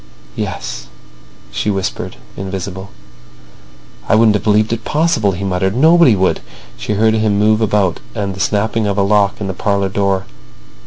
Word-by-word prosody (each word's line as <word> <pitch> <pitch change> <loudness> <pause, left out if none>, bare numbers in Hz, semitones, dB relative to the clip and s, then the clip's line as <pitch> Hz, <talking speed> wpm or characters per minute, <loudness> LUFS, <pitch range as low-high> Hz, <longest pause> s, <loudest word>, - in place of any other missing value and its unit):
"Yes," 60 - -5 0.6
she - - -2
whispered, 95 -2 -3 0.2
invisible. 95 0 -6 1.2
"I - - +5
wouldn't 110 -1 +5
have 105 - -1
believed 110 +1 +2
it 115 -1 -4
possible," 150 -10 +1
he 90 +2 -5
muttered. 95 +1 -1
"Nobody 160 -2 +5
would." 95 -1 +1 0.4
She - - -3
heard 110 +2 +3
him 110 -2 +1
move 110 +1 +3
about 100 -5 +1 0.2
and 100 -3 -2
the 95 - -10
snapping 110 +1 0
of 100 0 -1
a 100 - +3
lock 100 0 +2
in 105 - -4
the 95 - -3
parlour 100 +1 0
door. 95 -1 0
100 Hz, 160 wpm, -16 LUFS, 95-110 Hz, 1.2 s, I